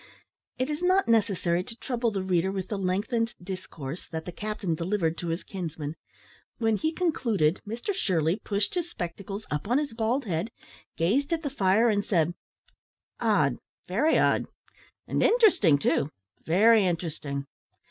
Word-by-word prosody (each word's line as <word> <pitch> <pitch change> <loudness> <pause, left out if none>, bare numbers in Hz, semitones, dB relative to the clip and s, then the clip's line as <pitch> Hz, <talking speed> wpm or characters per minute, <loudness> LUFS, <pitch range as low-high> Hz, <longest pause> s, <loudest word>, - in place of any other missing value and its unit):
It 255 +3 -1
is 300 +2 -3
not 370 +2 +3
necessary 195 -6 +2
to 230 +4 -11
trouble 240 -2 -1
the 195 -3 -2
reader 185 0 +1
with 190 -1 -4
the 210 - -2
lengthened 210 +5 0
discourse 175 -5 -7
that 160 -1 -5
the 180 - -5
captain 210 -2 -3
delivered 170 0 0
to 175 - -4
his 165 +2 -2
kinsman. 160 -5 -5 0.6
When 225 -2 +2
he 315 +9 0
concluded, 230 - +1
Mr 235 - -3
Shirley 180 - +1
pushed 200 -1 -1
his 350 -1 -2
spectacles 195 - -6
up 150 +5 -2
on 245 +4 +3
his 290 -5 -1
bald 235 +4 0
head, 175 +2 -1 0.5
gazed 240 - +1
at 325 0 -1
the 285 - -2
fire, 210 -2 +3
and 205 -3 +2
said, 175 -4 +1 0.9
"Odd, 190 - +2 0.3
very 255 - +3
odd; - - +3 0.6
and - - 0
interesting 405 - +5
too 140 0 +1 0.4
very 215 +6 +5
interesting." 155 -6 -2
200 Hz, 155 wpm, -27 LUFS, 170-235 Hz, 0.9 s, interesting